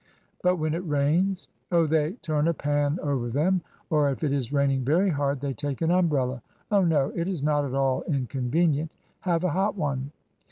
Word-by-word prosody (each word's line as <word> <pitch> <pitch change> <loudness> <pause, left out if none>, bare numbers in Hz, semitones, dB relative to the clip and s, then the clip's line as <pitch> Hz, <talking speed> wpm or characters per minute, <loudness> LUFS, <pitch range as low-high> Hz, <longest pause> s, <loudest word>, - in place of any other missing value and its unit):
But 180 0 +3
when 155 -2 -1
it 165 - -1
rains? 160 +6 +1
" - - -46
Oh, 170 -2 +4
they 155 +1 +1
turn 155 -1 +1
a 170 - +1
pan 145 +1 0
over 135 -5 -1
them, 170 +9 +1 0.3
or 150 -2 +3
if 135 - -4
it 145 -2 +1
is 135 -3 -2
raining 140 -2 +1
very 175 +9 +2
hard 140 -2 0
they 140 -1 -2
take 145 0 -4
an 165 - +2
umbrella. 140 -8 +1 0.3
Oh, 200 -1 +4
no, 150 -5 +2
it 170 0 -1
is 180 -7 -3
not 145 -1 +2
at 135 -1 -4
all 135 -1 +1
in 140 -5 0
convenient. 145 +5 0 0.3
Have 175 -2 0
a 180 - +1
hot 195 +6 0
one." 140 -4 -2
150 Hz, 205 wpm, -26 LUFS, 140-170 Hz, 0.3 s, Oh